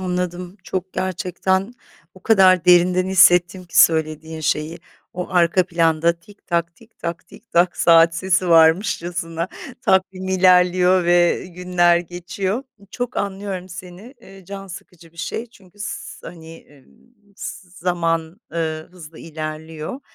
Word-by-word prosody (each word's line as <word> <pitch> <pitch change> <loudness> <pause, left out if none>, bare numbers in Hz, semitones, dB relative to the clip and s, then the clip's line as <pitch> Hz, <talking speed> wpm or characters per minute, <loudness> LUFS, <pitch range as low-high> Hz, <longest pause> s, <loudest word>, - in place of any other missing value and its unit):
anladım. 180 0 -4
Çok 185 0 -5
gerçekten 185 +2 -2 0.4
o - - -17
kadar 190 -5 +4
derinden 180 +1 +4
hissettim 180 -1 +4
ki 175 - -2
söylediğin 160 0 +2
şeyi. 155 +2 -2 0.4
O 180 - -3
arka 175 0 +2
planda 165 -1 +2
tik 205 +1 -20
tak, 170 -1 -1
tik 225 +4 -22
tak, 170 0 -6
tik 230 - -18
tak 175 +1 +2
saat 165 0 +5
sesi 185 +1 0
varmışçasına 165 0 +2 0.3
takvim 190 0 0
ilerliyor 180 -1 +4
ve 175 +1 +2
günler 175 -1 +2
geçiyor. 175 +6 -4 0.3
Çok 245 0 -5
anlıyorum 195 -2 -4
seni, 185 +7 -11
eee, 195 -3 -15
can 195 +1 -8
sıkıcı 170 -2 -13
bir - - -26
şey 170 +7 -4
çünkü 200 -4 -22
s 205 - -7
hani, 165 -1 -11
emm, 140 -3 -21 0.5
z - - -9 0.3
zaman, 170 +1 -2
ııı, 160 -1 -3
hızla 165 -3 -13
ilerliyor. 155 - -7
180 Hz, 130 wpm, -20 LUFS, 165-185 Hz, 0.5 s, saat